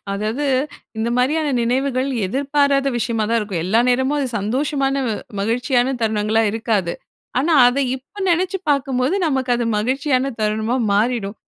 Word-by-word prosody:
அதாவது 215 +8 -2 0.5
இந்த 225 +1 0
மாரியான 295 +5 +1
நினைவுகள் 260 +2 0 0.2
எதிர்பாராத 275 +4 +1
விஷயமா 225 -2 -1
தான் 230 - +3
இருக்கும். 195 -6 -3
எல்லா 215 +6 +3
நேரமும் 260 +3 +1
அது 280 - 0
சந்தோஷமான, 270 +6 -1 0.5
மகிழ்ச்சியான 245 +4 +1
தருணங்களா 220 0 +1
இருக்காது. 215 -5 -1 0.5
ஆனா, 310 +6 +1
அதை 255 +3 +2
இப்போ 270 +10 -16
நினைச்சு 370 +3 +1
பார்க்கும்போது, 270 +1 +1
நமக்கு 265 -4 -1
அது 240 - -1
மகிழ்ச்சியான 265 +3 0
தருணமா 215 +3 0 0.2
மாறிடும். 215 -1 0
250 Hz, 130 wpm, -20 LUFS, 220-275 Hz, 0.5 s, தான்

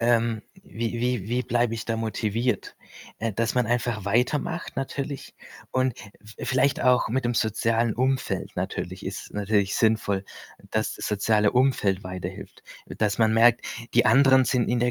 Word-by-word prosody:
ähm, 115 -2 +2 0.2
wie 115 +1 -4
wie 120 -5 -1
wie 125 +1 0
bleibe 120 -1 +1
ich 110 - -5
da 115 -1 -2
motiviert? 115 0 -2 0.4
Äh, 115 0 -2
dass 115 +2 -1
man 125 -1 +2
einfach 120 -3 -1
weitermacht 145 - 0
natürlich 135 +1 -4 0.4
und 130 -2 0
v 105 +1 -14
vielleicht 130 +2 +2
auch 125 0 +4
mit'm 120 0 0
sozialen 115 0 +1
Umfeld 130 +1 -1
natürlich, 90 +2 -4
ist 95 +1 -6
natürlich 105 -1 +1
sinnvoll, 110 -3 +1 0.5
dass - - 0
soziale 105 0 +1
Umfeld 125 -7 +2
weiterhilft. 90 -1 -7 0.2
Dass 105 +1 -1
man 110 -1 +4
merkt, 120 +1 +5 0.3
die - - +5
anderen 130 +3 +6
sind 125 0 +1
in 120 0 +1
der 125 0 +2
115 Hz, 150 wpm, -25 LUFS, 105-125 Hz, 0.5 s, anderen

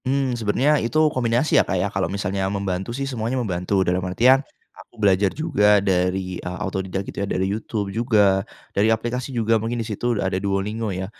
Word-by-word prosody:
Mmm, 135 0 0
sebenarnya 125 +6 +1
itu 120 - -1 0.2
kombinasi 120 +3 +1
ya, - - 0
Kak, - - 0
ya. - - +1
Kalau - - -1
misalnya 95 0 -2
membantu 95 -1 -3
sih 140 - -2
semuanya 125 -1 -2
membantu. 95 -4 0
Dalam 90 +1 +1
artian 130 +8 +4 0.3
aku - - -17
belajar 100 -2 +3
juga 105 - +3
dari, 90 -1 0
eee, 90 0 -6
otodidak 95 0 -3
gitu - - -6
ya 100 - -1
dari 95 - 0
YouTube 105 -2 -4
juga 105 -4 +3 0.3
dari 105 +3 +2
aplikasi 120 +3 -1
juga 115 -3 +1
mungkin 115 +2 -2
di 115 - -2
situ 115 +2 -2
ada 95 -1 -1
Duolingo 105 +3 -2
ya, 95 -1 -3
105 Hz, 190 wpm, -22 LUFS, 95-120 Hz, 0.3 s, artian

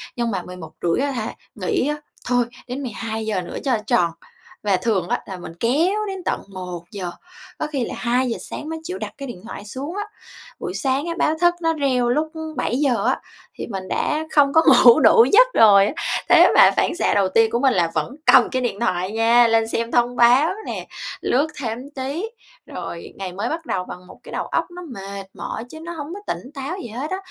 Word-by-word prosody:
nhưng 235 -2 -1
mà 190 - -2
11:30 180 - -3
á - - -2
hả, 230 -4 -4 0.2
nghĩ 390 - 0
á, 300 - 0 0.3
thôi 245 -1 +2 0.2
đến 260 +3 -5
12:00 220 -4 -3
nữa 175 - -7
cho 260 -4 +2
tròn, 170 -2 +3 0.5
và 200 -3 +2
thường 190 -5 0
á - - 0
là 190 -2 -7
mình 175 -2 -9
kéo 340 - +1
đến 385 -2 -5
tận - - -1
1:00 180 0 -6 0.5
có 310 - -1
khi 275 -5 -2
là - - -6
2:00 245 0 0
sáng 305 - -6
mới 320 0 -4
chịu 365 +3 -5
đặt - - -6
cái 275 - -6
điện 195 -8 -8
thoại 205 - -8
xuống 275 - -6
á. 415 - -1 0.6
Buổi - - -4
sáng 270 +2 0
á 335 - -1
báo 310 - +2
thức 350 0 +4
nó 325 -1 +2
reo 260 -5 +1
lúc 310 +4 0 0.3
7:00 255 -1 +1
á, - - +1 0.4
thì - - -6
mình 190 -4 -5
đã 310 +1 -1
không 285 -2 +5
có 320 - +6 0.2
ngủ 235 -1 +9
đủ 230 - +7
giấc - - +8
rồi 200 -3 +7
á. - - -3 0.4
Thế - - +8
mà - - +8
phản - - +1
xạ 360 - +1
đầu 195 -2 +2
tiên 225 +3 +3
của 235 - +1
mình 265 -1 +3
là 170 -2 +1
vẫn 270 - -2
cầm - - +6
cái 260 - -1
điện 235 -5 -2
thoại 185 -4 0
nha, 230 +2 +5
lên 225 0 +2
xem 230 +1 -2
thông 245 0 +2
báo 250 +6 +5 0.2
nè, - - -5 0.3
lướt 280 +5 +2
thêm 245 +2 -4
tí, 280 +8 -3 0.4
rồi - - -7
ngày 190 -2 -6
mới 205 +6 -3
bắt 330 0 -4
đầu 190 -6 -1
bằng 180 0 -10
một - - -14
cái - - -11
đầu - - -3
óc - - 0
nó 355 +1 -9
mệt 195 -2 -7
mỏi 220 - -5
chứ 315 - -10
nó 335 +2 -7
hông 310 +1 -6
có 400 - -7
tỉnh 255 - -11
táo 285 +5 -5
gì 240 - -6
hết 255 +9 -5
á. 375 - -1
245 Hz, 220 wpm, -21 LUFS, 205-290 Hz, 0.6 s, ngủ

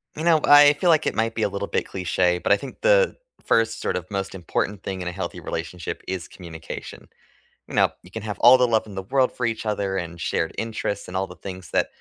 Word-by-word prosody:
You 155 - -5
know, 165 -2 +5
I 145 0 +8
feel 175 +4 0
like 160 -2 +4
it - - -1
might 115 +1 0
be 110 - -2
a - - +2
little 100 +1 -4
bit - - -1
cliché, 90 -1 0
but - - +3
I 100 - +3
think 135 - -9
the - - +4 0.3
1st 115 0 +1
sort - - -1
of 90 - -7
most 95 -1 -3
important 95 +2 -3
thing 95 -1 -5
in 90 - -3
a - - -5
healthy 90 -1 -5
relationship 80 +1 -5
is 95 -2 -4
communication. 80 -3 -9 0.6
You - - -11
know, - - +4
you 90 - -16
can 110 - -6
have 105 -1 -5
all 125 +2 +8
the 125 -1 +3
love 110 -1 +1
in 105 - -11
the 95 - -4
world 130 +4 +2
for 125 - -3
each 115 -1 -3
other 100 -2 -1
and 85 -1 -5
shared 80 - -1
interests 110 -3 -3
and 90 +1 -4
all 95 - 0
the - - -12
things 95 -3 -9
that - - +2
100 Hz, 250 wpm, -23 LUFS, 90-115 Hz, 0.6 s, I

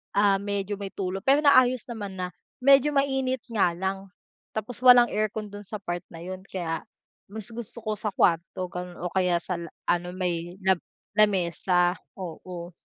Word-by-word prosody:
ah, 200 -1 +4
medyo 200 0 -3
may 195 -1 -5
tulo 190 0 -2
pero 275 +8 +3
naayos 255 -4 +5
naman 205 -4 -6
na. 180 -1 -3 0.4
Medyo 275 +2 +6
mainit 265 -2 +1
nga 195 -6 +3
lang, 190 +2 -3 0.5
tapos 220 +2 -4
walang 245 -1 +9
aircon 215 0 -2
dun 205 0 -9
sa 215 - -7
part 175 -2 -4
na 165 - -9
yun 185 +1 -6
kaya 165 -4 -3 0.4
mas 210 0 -5
gusto 235 +1 -6
ko 215 -1 -1
sa 210 -2 -1
kwarto 175 +2 +1
ganun 180 0 -6
o 175 0 -3
kaya 180 -2 +2
sa 180 - -2
la 170 - -6 0.2
ano 175 +1 -1
may 175 -1 -2
lab 190 -2 +4 0.3
lamesa, 180 -3 +2 0.2
oo. 175 -1 -7
195 Hz, 170 wpm, -26 LUFS, 180-220 Hz, 0.5 s, walang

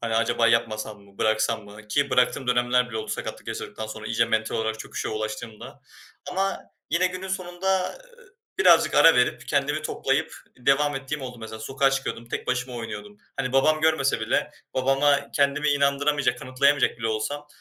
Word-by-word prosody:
Hani 115 -1 -2
acaba 115 +1 +2
yapmasam 110 -2 0
mı, 100 0 -21
bıraksam 110 -1 +1
mı? 105 +1 -13
Ki 140 +5 +1
bıraktığım 125 +1 +2
dönemler 125 0 +2
bile 110 - -5
oldu - - -6
sakatlık - - -5
yaşadıktan 110 - -5
sonra 110 0 -7
iyice 115 +1 +2
mental 110 -1 -1
olarak 110 0 -2
çöküşe - - -5
ulaştığımda 110 0 -6 0.5
ama 195 +1 0 0.3
yine 170 +4 +3
günün 185 +1 -5
sonunda 185 - -1 0.6
birazcık - - +5
ara 165 - +7
verip 125 - +1
kendimi 145 +1 0
toplayıp 150 +1 -1 0.2
devam 140 +3 +2
ettiğim 135 +2 -4
oldu 125 -2 -7
mesela 110 0 -7
sokağa 135 +4 +1
çıkıyordum 135 -3 -3
tek - - -4
başıma 125 0 -2
oynuyordum. 105 -3 -7 0.2
Hani 125 - -2
babam 155 +4 +3
görmese 155 -4 +2
bile - - 0 0.2
babama 135 +2 +3
kendimi 140 +1 +2
inandıramayacak, 140 -2 +2
kanıtlayamayacak 140 +1 +2
bile 115 - -2
olsam, 145 +7 -3
130 Hz, 160 wpm, -25 LUFS, 110-145 Hz, 0.6 s, ara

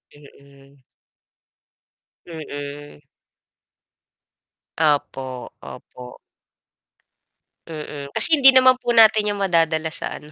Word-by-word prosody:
Mhm. 140 -1 -21 1.4
Mhm. 145 -3 -10 1.8
Opo, 135 -4 -3
opo. 125 0 -13 1.5
Mm, 150 -3 -9
kasi 315 -3 +4
hindi 270 -1 +6
naman 255 0 +5
po 240 -1 -3
natin 220 -2 +4
'yan 205 - -8
madadala 165 -4 -1
sa - - -6
ano, 150 - -14
155 Hz, 80 wpm, -20 LUFS, 140-205 Hz, 1.8 s, hindi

